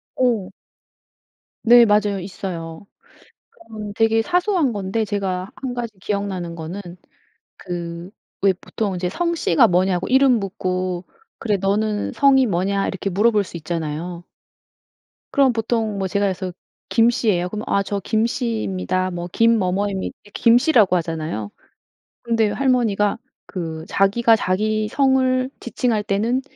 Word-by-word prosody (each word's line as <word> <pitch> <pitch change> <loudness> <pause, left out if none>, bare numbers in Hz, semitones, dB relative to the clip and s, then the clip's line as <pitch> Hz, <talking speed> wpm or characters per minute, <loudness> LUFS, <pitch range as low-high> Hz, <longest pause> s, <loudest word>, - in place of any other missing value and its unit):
어. 230 -7 +1 1.1
네 240 0 +8
맞아요. 205 -2 +2
있어요. 180 -2 -7 0.6
그런 220 - -9
되게 225 +1 +3
사소한 355 - +1
건데 205 +1 -2
제가 195 -2 -3
1 260 -2 -5
가지 240 -2 -4
기억나는 190 -4 -3
거는 170 +5 -6 0.8
그 175 -1 -6 0.3
왜 195 -1 +4
보통 200 +2 -4
이제 180 0 -2
성씨가 335 - +2
뭐냐고 180 0 +1
이름 265 -1 +4
묻고 185 -2 -3 0.3
"그래 210 -3 0
너는 205 +2 0
성이 270 -2 +5
뭐냐." 195 0 0
이렇게 195 +1 -3
물어볼 210 +2 +3
수 175 - -8
있잖아요. 165 +2 -4 1.1
그럼 270 -3 +3
보통 225 -2 -1
뭐 195 -1 -1
제가 200 +2 0
그래서 185 -1 -3 0.4
김 230 0 +5
씨예요 205 -7 +1
그러면 215 +3 -5
"아 200 - +3
저 200 0 -3
김 220 +1 +1
씨입니다. 195 - -2
뭐 175 -1 -5
김 230 0 +4
뭐뭐입니다." 195 0 -1 0.2
김 235 0 +5
씨라고 245 - +4
하잖아요. 160 - -3 0.7
근데 225 -3 +1
할머니가 230 -6 +1 0.3
그 160 -3 -5
자기가 225 +4 +3
자기 215 +3 0
성을 260 0 +2
지칭할 235 -3 -1
때는 225 +6 0
205 Hz, 270 characters per minute, -21 LUFS, 185-230 Hz, 1.1 s, 네